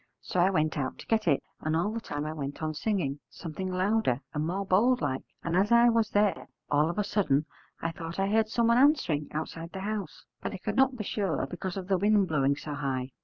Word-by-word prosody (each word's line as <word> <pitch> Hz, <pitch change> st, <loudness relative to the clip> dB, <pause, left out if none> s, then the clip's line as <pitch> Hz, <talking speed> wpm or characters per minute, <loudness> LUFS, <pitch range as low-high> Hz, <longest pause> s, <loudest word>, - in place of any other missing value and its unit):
So 185 Hz, -, -3 dB
I 180 Hz, +2 st, +5 dB
went 155 Hz, -5 st, +1 dB
out 130 Hz, -2 st, -2 dB
to -, -, -11 dB
get 220 Hz, -4 st, +1 dB
it, 140 Hz, -4 st, +3 dB, 0.2 s
and 155 Hz, 0 st, -1 dB
all 175 Hz, +6 st, +1 dB
the 230 Hz, -, -3 dB
time 145 Hz, -7 st, -4 dB
I 155 Hz, -, -3 dB
went 145 Hz, 0 st, -5 dB
on 155 Hz, 0 st, -1 dB
singing, 155 Hz, -6 st, -1 dB
something 185 Hz, +2 st, -5 dB
louder 185 Hz, -, +1 dB
and 150 Hz, +1 st, -1 dB
more 195 Hz, +3 st, -2 dB
bold 235 Hz, +7 st, +4 dB
like. 130 Hz, -9 st, -1 dB, 0.2 s
And 165 Hz, 0 st, -1 dB
as 195 Hz, +5 st, +2 dB
I 235 Hz, 0 st, +7 dB
was 230 Hz, -2 st, +2 dB
there 205 Hz, -1 st, +1 dB, 0.2 s
all 150 Hz, +2 st, +3 dB
of 170 Hz, -, -4 dB
a 210 Hz, -, +2 dB
sudden 170 Hz, -8 st, +1 dB, 0.4 s
I 165 Hz, -, 0 dB
thought 165 Hz, 0 st, -7 dB
I 195 Hz, -, +2 dB
heard 215 Hz, +1 st, +2 dB
someone 235 Hz, +1 st, +3 dB
answering 255 Hz, -, +3 dB
outside 165 Hz, +2 st, -5 dB
the 190 Hz, -, -5 dB
house, 205 Hz, -4 st, -4 dB, 0.2 s
but -, -, -4 dB
I -, -, -4 dB
could 205 Hz, +3 st, -3 dB
not 265 Hz, 0 st, +3 dB
be 215 Hz, -, -3 dB
sure 195 Hz, -9 st, -1 dB
because 175 Hz, +5 st, -5 dB
of 185 Hz, -2 st, -5 dB
the 190 Hz, -2 st, +2 dB
wind 205 Hz, 0 st, +4 dB
blowing 140 Hz, -2 st, +2 dB
so 150 Hz, +1 st, -6 dB
high. 135 Hz, -2 st, -2 dB
185 Hz, 235 wpm, -29 LUFS, 155-210 Hz, 0.4 s, I